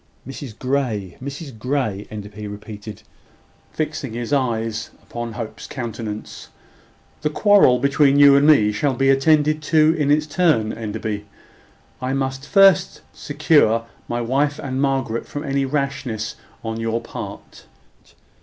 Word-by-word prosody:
"Mrs 135 -4 -8
Grey, 120 -8 -2
Mrs 140 -3 -7
Grey," 120 -6 -2
Enderby 105 0 -8
repeated, 105 0 -9 0.7
fixing 155 -5 -3
his 120 +4 -3
eyes 115 -4 -1
upon 120 -1 -6
Hope's 115 -1 -7
countenance. 110 - -6 0.7
"The 150 - 0
quarrel 195 -6 +5
between 140 +1 +3
you 140 -1 +8
and 140 +1 +4
me 110 -9 +5
shall 130 +6 0
be 135 +1 +3
attended 150 +2 +3
to 155 +1 +4
in 150 -4 0
its 150 +1 +3
turn, 150 -9 +1
Enderby. 105 -1 -4 0.7
I 130 +1 -1
must 135 0 -3
first 195 -4 +4
secure 145 -6 +2 0.2
my 120 0 -2
wife 140 +5 0
and 130 -1 -3
Margaret 135 -5 -1
from 145 - -5
any 140 -1 0
rashness 135 -5 -3 0.3
on 115 0 -4
your 115 0 -1
part. 115 - -9
130 Hz, 130 wpm, -21 LUFS, 110-145 Hz, 0.7 s, you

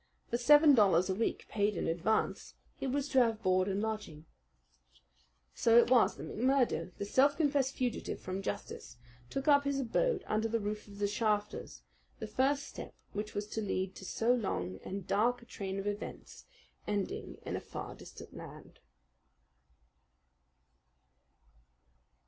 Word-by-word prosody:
For 235 - +2
seven 295 +4 +7
dollars 190 -6 +4
a - - +1
week 225 +4 -2
paid 205 -2 0
in - - -1
advance 175 +7 0 0.2
he - - -4
was 275 +2 -1
to 265 - +4
have 230 -2 +2
board 185 0 +3
and 200 +1 -1
lodging. 210 -9 -4 1.3
So 230 0 +4
it 240 +1 +5
was 250 -2 +5
that - - -7
McMurdo, 240 - +1
the 200 - -3
self 275 +7 +3
confessed 280 -4 +1
fugitive 250 -2 -2
from 185 +1 -4
justice, 155 - -6 0.3
took 270 - -4
up 285 -1 +6
his 280 -1 0
abode 410 - 0
under 215 +1 0
the 230 +1 0
roof 210 0 -4
of 200 -1 -12
the 205 - 0
Shafters, 210 0 -2 0.3
the - - -5
first 270 +6 +1
step - - -9 0.2
which 210 +1 -4
was 205 0 -1
to 220 - -3
lead 190 -2 -2
to - - -11
so 225 +5 +1
long 95 - -2
and 195 -1 -5
dark 240 +5 +1
a - - -15
train 195 -4 -5
of 195 - -4
events, 205 0 -6 0.4
ending 205 -2 -3
in - - -3
a - - -3
far - - -7
distant - - -12
land. - - -11
215 Hz, 155 wpm, -33 LUFS, 200-260 Hz, 1.3 s, seven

